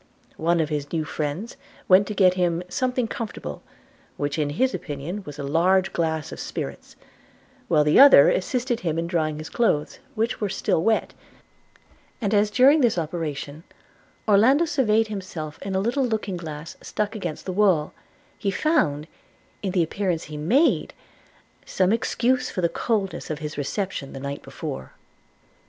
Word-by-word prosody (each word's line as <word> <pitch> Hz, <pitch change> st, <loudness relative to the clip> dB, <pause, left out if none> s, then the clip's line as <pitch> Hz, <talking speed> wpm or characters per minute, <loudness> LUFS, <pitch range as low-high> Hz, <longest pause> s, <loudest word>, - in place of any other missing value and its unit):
One 170 Hz, +2 st, +1 dB
of 155 Hz, -2 st, 0 dB
his 145 Hz, -2 st, -3 dB
new 160 Hz, -2 st, -1 dB
friends 155 Hz, -, -4 dB, 0.3 s
went 190 Hz, +2 st, +6 dB
to 210 Hz, -, -4 dB
get 185 Hz, -3 st, +5 dB
him 175 Hz, -1 st, 0 dB
'something 250 Hz, +4 st, -1 dB
comfortable,' 210 Hz, -, -6 dB, 0.6 s
which 145 Hz, +1 st, -2 dB
in 150 Hz, -1 st, 0 dB
his 260 Hz, -, +1 dB
opinion 150 Hz, +7 st, -5 dB
was 145 Hz, -1 st, -8 dB
a 140 Hz, -, -5 dB
large 180 Hz, +6 st, +2 dB
glass 160 Hz, -2 st, -1 dB
of -, -, -8 dB
spirits; -, -, -6 dB, 0.7 s
while 150 Hz, -, +4 dB
the 150 Hz, +7 st, +4 dB
other 275 Hz, -, +9 dB
assisted 240 Hz, +5 st, 0 dB
him 165 Hz, -3 st, -2 dB
in 165 Hz, -, -1 dB
drying 160 Hz, -3 st, -1 dB
his 155 Hz, +1 st, -7 dB
clothes, 185 Hz, -11 st, 0 dB, 0.2 s
which 225 Hz, +1 st, -1 dB
were 205 Hz, -, 0 dB
still 185 Hz, -3 st, 0 dB
wet; 220 Hz, +5 st, +1 dB, 1.1 s
and 205 Hz, -2 st, -1 dB
as 205 Hz, 0 st, +3 dB
during 265 Hz, +8 st, +5 dB
this 235 Hz, -7 st, +2 dB
operation 155 Hz, -2 st, -4 dB, 0.6 s
Orlando 240 Hz, +10 st, +5 dB
surveyed 225 Hz, -8 st, +2 dB
himself 180 Hz, -7 st, -6 dB
in 195 Hz, -1 st, -4 dB
a -, -, +2 dB
little 240 Hz, +7 st, 0 dB
looking 215 Hz, -5 st, -2 dB
glass 160 Hz, -2 st, -7 dB
stuck 210 Hz, 0 st, -3 dB
against 175 Hz, -7 st, -5 dB
the 185 Hz, -, -3 dB
wall, 185 Hz, -6 st, +2 dB, 0.5 s
he 200 Hz, -, -1 dB
found, 185 Hz, -, +1 dB, 0.6 s
in 195 Hz, -, -2 dB
the 180 Hz, -2 st, +2 dB
appearance 175 Hz, 0 st, -2 dB
he 150 Hz, -, -9 dB
made, 220 Hz, -, +2 dB, 0.7 s
some 185 Hz, +2 st, +1 dB
excuse 250 Hz, +2 st, +1 dB
for 185 Hz, -, -3 dB
the 170 Hz, -, +2 dB
coldness 205 Hz, -3 st, -2 dB
of 155 Hz, -, -2 dB
his 150 Hz, -1 st, -6 dB
reception 145 Hz, 0 st, -3 dB
the 135 Hz, -, -7 dB
night 140 Hz, +1 st, -5 dB
before. 65 Hz, 0 st, -7 dB
185 Hz, 160 wpm, -24 LUFS, 155-215 Hz, 1.1 s, other